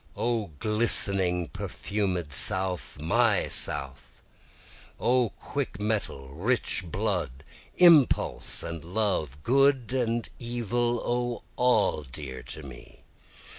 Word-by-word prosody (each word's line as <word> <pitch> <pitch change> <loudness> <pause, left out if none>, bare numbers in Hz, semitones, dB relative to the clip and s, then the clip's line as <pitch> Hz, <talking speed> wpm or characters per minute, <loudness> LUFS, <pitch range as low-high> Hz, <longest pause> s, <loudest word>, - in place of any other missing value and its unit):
O 115 -3 -1
glistening 95 -4 +2
perfumed 90 -7 -4
South! 95 -6 +4
my 80 +3 +1
South! 70 -1 -1 0.8
O 125 -2 +1
quick 135 0 -6
mettle, 105 -11 -3
rich 95 - -1
blood, 65 -4 -3 0.3
impulse 170 -7 +4
and 85 -2 -6
love! 85 - -2
good 135 -1 +2
and 120 -3 -1
evil! 120 0 -2
O 120 0 -2
all 110 -10 +2
dear 65 -1 -7
to 75 - -8
me! 65 -3 -13
105 Hz, 95 wpm, -26 LUFS, 80-120 Hz, 0.8 s, South